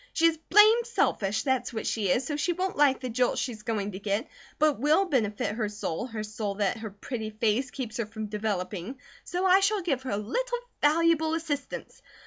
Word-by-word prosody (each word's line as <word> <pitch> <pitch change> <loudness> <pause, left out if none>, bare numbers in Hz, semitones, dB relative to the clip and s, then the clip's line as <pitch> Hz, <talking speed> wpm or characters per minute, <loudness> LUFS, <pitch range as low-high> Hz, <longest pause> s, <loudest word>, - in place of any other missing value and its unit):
She 330 - +2
is 325 -1 +3
blame 430 +6 +7
selfish, 215 - 0
that's 260 -3 0
what 220 -2 -4
she 210 -4 0
is, 245 +8 +2
so 300 - -2
she 330 +4 0
won't 370 +2 -2
like 285 -2 +4
the 255 - -3
jolt 245 +1 +1
she's 230 -5 -3
going 215 -3 -2
to 190 - -7
get; 205 +5 -1 0.3
but 310 0 +4
it 280 - -9
will 305 +9 +3
benefit 215 - 0
her 215 -2 -2
soul, 210 +1 -4
her 225 -3 -5
soul 215 -1 -4
that 205 +3 0
her 220 -1 -5
pretty 215 +2 -5
face 225 +4 0
keeps 245 -5 -5
her 230 -3 -2
from 220 0 -6
developing, 205 +1 -3 0.3
so 360 +2 -2
I 375 +1 +6
shall 400 0 +1
give 275 -7 0
her 260 - -6
a 200 - 0
little 485 - -2 0.2
valuable 320 +1 +3
assistance. 295 -4 -4
245 Hz, 210 wpm, -28 LUFS, 215-320 Hz, 0.3 s, blame